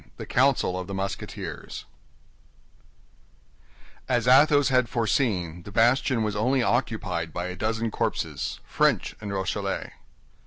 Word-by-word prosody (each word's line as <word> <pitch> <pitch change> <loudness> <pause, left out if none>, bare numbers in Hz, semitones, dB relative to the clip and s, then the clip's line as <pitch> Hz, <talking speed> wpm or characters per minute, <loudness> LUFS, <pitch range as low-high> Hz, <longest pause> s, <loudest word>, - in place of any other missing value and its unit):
THE - - -6
COUNCIL 125 -8 +2
OF 90 - -6
THE 100 - -5
MUSKETEERS 95 +1 -5 2.2
As 120 -2 +1
Athos 145 +1 +6
had 125 -3 +2
foreseen, 105 - 0
the 100 - -11
bastion 120 +2 +3
was 105 -1 -2
only 125 +5 +2
occupied 110 -10 -1
by 90 +2 -4
a 90 0 -5
dozen 115 +2 -1
corpses, - - -2
French - - +1
and 105 -2 -5
Rochellais. 95 -2 -3
115 Hz, 120 wpm, -26 LUFS, 95-125 Hz, 2.2 s, Athos